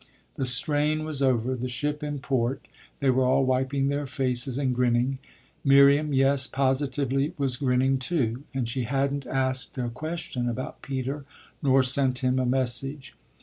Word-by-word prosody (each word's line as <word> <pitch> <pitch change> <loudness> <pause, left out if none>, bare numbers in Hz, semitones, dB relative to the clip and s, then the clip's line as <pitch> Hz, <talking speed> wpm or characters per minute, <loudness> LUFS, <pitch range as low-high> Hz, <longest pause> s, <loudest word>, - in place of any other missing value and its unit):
The 135 - -2
strain 150 +4 +3
was 150 -3 -4
over, 130 -2 +1
the 125 0 -4
ship 145 +4 -2
in 145 -1 -3
port 130 -2 -2 0.3
they 135 -1 +3
were 130 +1 +2
all 130 +1 +3
wiping 130 +1 0
their 140 0 -2
faces 130 0 -1
and 135 -3 0
grinning. 125 +2 +1 0.4
Miriam 140 +2 +5
yes, 135 0 +3
positively 135 +2 0
was 135 -3 +1
grinning 130 -1 +1
too, 125 -4 -1
and 130 -3 -2
she 120 +1 -2
hadn't 140 +2 -1
asked 130 +1 -2
a 120 -2 -2
question 125 -2 -4
about 130 +2 -6
Peter 135 +1 -4 0.4
nor 135 -2 +4
sent 130 0 +2
him 130 0 +2
a 130 - 0
message. 130 +2 -2
135 Hz, 155 wpm, -26 LUFS, 125-140 Hz, 0.4 s, Miriam